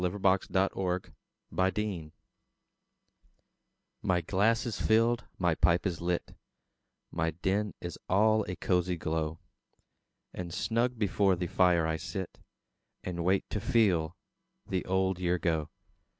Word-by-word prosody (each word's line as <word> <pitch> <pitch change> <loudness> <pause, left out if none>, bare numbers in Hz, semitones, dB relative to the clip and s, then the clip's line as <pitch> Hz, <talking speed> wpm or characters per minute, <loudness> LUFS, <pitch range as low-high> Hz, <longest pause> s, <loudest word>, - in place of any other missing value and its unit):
The 90 - +2
Passing 95 0 +2
of 95 0 -1
the 105 - +1
Year 85 -7 -5 1.9
My 90 -2 +1
glass 105 +8 +2
is 120 - -3
filled, 115 +2 +3
my 90 -2 +2
pipe 85 +3 +2
is 90 -4 -2
lit, 85 0 -2 0.8
My 80 -1 0
den 95 +5 -1
is 85 - -6
all 110 +3 +4
a 90 - -3
cosy 90 -1 0
glow; 80 0 -2 1.0
And 85 -1 -5
snug 115 +6 0
before 100 -2 +2
the 90 0 -3
fire 85 -1 +3
I 80 0 0
sit, 95 +1 -6 0.6
And 85 -2 -3
wait 95 +2 +2
to 105 - -2
FEEL 95 -8 +2 0.5
the 95 -2 -2
old 95 0 +1
year 90 0 +1
go. 80 -3 -1
90 Hz, 130 wpm, -30 LUFS, 85-100 Hz, 1.9 s, all